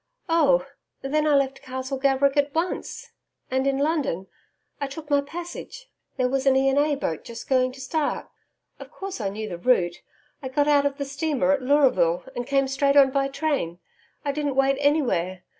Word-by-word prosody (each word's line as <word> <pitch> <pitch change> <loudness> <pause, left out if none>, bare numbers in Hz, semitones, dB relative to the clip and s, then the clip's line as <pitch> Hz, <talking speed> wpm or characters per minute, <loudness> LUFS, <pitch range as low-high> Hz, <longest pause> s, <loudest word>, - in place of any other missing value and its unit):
'Oh, 280 -6 +3 0.4
then 300 +3 +1
I 295 - +4
left 270 -1 0
Castle 260 +1 -5
Gaverick 275 +1 +2
at 285 +1 +1
once, 410 +7 -3 0.4
and, 260 +1 +1
in 275 -1 +1
London, 280 - 0 0.5
I 280 - -2
took 295 +2 -9
my 285 0 +4
passage 350 +11 -8 0.3
there 255 - +2
was 270 +1 -1
an 265 - +5
E. 270 0 +3
and 270 +1 +2
A. 295 0 +2
boat 165 - -3
just 230 -1 -9
going 255 -1 +2
to 265 - -13
start. 290 +3 -2 0.5
Of - - -10
course 390 - -7
I 200 - -1
knew 215 +2 -5
the 175 -4 -6
route. 175 -6 +2 0.4
I 260 - -5
got 290 +2 +1
out 285 -1 +4
of 280 -1 -5
the 280 - -3
steamer 280 -1 0
at 285 -1 +1
Leuraville, 250 - +3
and 245 0 -4
came 275 -1 +2
straight 275 +1 +1
on 270 -1 +7
by 275 0 +1
train 275 - -2 0.5
I 285 - +1
didn't 290 -1 -2
wait 270 0 +3
anywhere. 240 - +1
275 Hz, 190 wpm, -24 LUFS, 260-290 Hz, 0.5 s, on